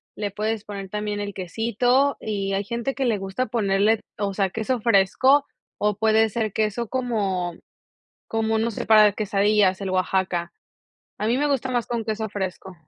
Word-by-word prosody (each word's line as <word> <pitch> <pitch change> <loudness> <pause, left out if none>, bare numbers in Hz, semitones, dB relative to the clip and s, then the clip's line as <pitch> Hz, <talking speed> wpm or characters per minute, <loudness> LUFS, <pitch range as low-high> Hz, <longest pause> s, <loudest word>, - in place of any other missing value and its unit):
le 205 -1 -3
puedes 215 +1 -2
poner 200 -2 -7
también 210 +1 -3
el 205 0 -4
quesito 235 +9 +1
y 195 -2 -2
hay 195 +1 0
gente 235 +5 -3
que 275 - -1
le 230 -5 +1
gusta 195 +6 -3
ponerle, 210 -1 +2 0.2
o 200 -1 -2
sea, 195 -1 +1
queso 225 +5 -2
fresco 230 +7 +4 0.3
o 210 -1 0
puede 220 0 +3
ser 215 -1 -2
queso 220 +2 -1
como 205 -8 -1 0.7
como, 220 0 0
no 230 +1 +1
sé, 220 - -5
para 215 -1 +7
quesadillas, 205 -2 +2
el 195 - -3
Oaxaca. 185 -2 0 0.7
A 210 - -1
mí 235 +3 +2
me 290 +2 +1
gusta 270 -2 0
más 245 -2 0
con 235 -1 -2
queso 220 0 -2
fresco. 190 -1 -5
210 Hz, 170 wpm, -24 LUFS, 195-230 Hz, 0.7 s, para